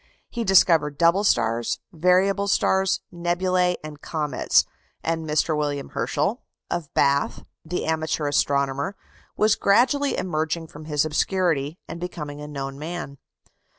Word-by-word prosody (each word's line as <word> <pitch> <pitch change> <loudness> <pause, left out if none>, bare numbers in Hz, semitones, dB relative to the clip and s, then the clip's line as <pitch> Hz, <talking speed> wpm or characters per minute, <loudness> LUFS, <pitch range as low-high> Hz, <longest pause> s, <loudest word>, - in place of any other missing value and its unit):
He 235 - -2
discovered 165 -7 +4
double 170 +5 +4
stars, 115 - +1 0.2
variable 185 +4 +2
stars, 190 -1 +2
nebulæ, 180 +1 +1
and 150 -1 -9
comets; 150 -3 +1 0.4
and 165 -1 -2
Mr. 155 +1 +1
William 145 -2 -2
Herschel, - - -1 0.3
of 160 -4 -3
Bath, 140 0 +2 0.2
the 180 +3 -3
amateur 160 -1 -1
astronomer, 140 +4 0 0.4
was 215 0 +4
gradually 255 +7 +2
emerging 160 -1 -2
from 150 +1 -11
his 150 -1 +1
obscurity, 155 -2 0
and 165 - -7
becoming 150 -5 -6
a 150 - -7
known 135 -1 -6
man. 155 -3 -6
160 Hz, 125 wpm, -24 LUFS, 145-180 Hz, 0.4 s, discovered